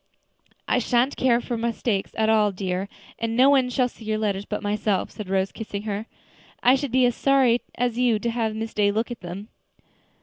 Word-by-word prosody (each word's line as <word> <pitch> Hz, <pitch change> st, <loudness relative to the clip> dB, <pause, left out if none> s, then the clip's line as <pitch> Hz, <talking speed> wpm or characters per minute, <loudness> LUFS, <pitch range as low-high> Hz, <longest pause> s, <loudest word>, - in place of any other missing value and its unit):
"I -, -, +2 dB
sha'n't 245 Hz, +3 st, +1 dB
care 240 Hz, -2 st, +3 dB
for 240 Hz, 0 st, -4 dB
mistakes 230 Hz, -3 st, -1 dB
at 220 Hz, -1 st, +1 dB
all, 215 Hz, -2 st, +3 dB
dear, 190 Hz, 0 st, -3 dB, 0.3 s
and 230 Hz, 0 st, -2 dB
no 265 Hz, +3 st, +6 dB
one 265 Hz, -3 st, +3 dB
shall 250 Hz, 0 st, +1 dB
see 235 Hz, -, -14 dB
your 215 Hz, 0 st, -1 dB
letters 205 Hz, -2 st, -1 dB
but -, -, -4 dB
myself," 205 Hz, -1 st, -1 dB
said 210 Hz, -4 st, -8 dB
Rose, 190 Hz, 0 st, 0 dB
kissing 205 Hz, -2 st, -6 dB
her. 210 Hz, +1 st, -4 dB, 0.6 s
"I 250 Hz, -, +6 dB
should 270 Hz, -1 st, -1 dB
be 255 Hz, 0 st, +4 dB
as 245 Hz, -, +2 dB
sorry 265 Hz, -3 st, +3 dB
as 245 Hz, 0 st, -1 dB
you 245 Hz, -3 st, +3 dB
to 235 Hz, +2 st, -2 dB
have 225 Hz, -2 st, -1 dB
Miss 225 Hz, +1 st, -4 dB
Day 205 Hz, -1 st, +2 dB
look 225 Hz, +4 st, -1 dB
at 240 Hz, -, -7 dB
them." 185 Hz, +5 st, -7 dB
225 Hz, 205 wpm, -24 LUFS, 205-245 Hz, 0.6 s, no